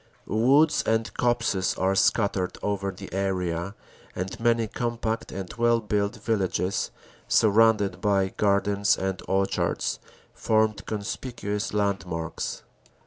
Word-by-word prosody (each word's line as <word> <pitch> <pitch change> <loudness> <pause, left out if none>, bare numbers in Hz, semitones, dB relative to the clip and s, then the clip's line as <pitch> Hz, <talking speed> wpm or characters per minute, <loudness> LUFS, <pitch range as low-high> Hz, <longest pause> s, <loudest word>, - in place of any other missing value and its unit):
Woods 135 - +4
and 110 0 0
copses 115 -6 +1
are 95 +1 +1
scattered 95 -2 +1
over 100 -1 -1
the 95 -1 -9
area 95 -1 -2 0.4
and 90 +1 -4
many 115 -1 +2
com 120 +2 -3
pact 115 0 -3
and 95 -1 -6
well 120 0 +4
built 105 -1 -1
villages 100 -4 -1 0.4
surrounded 105 -3 +3
by 100 -2 +2
gardens 100 0 +2
and 95 -1 -2
orchards 95 -1 0 0.3
formed 110 -1 +1
conspicuous 105 0 -3
landmarks. 95 -5 -2
100 Hz, 110 wpm, -26 LUFS, 95-110 Hz, 0.4 s, Woods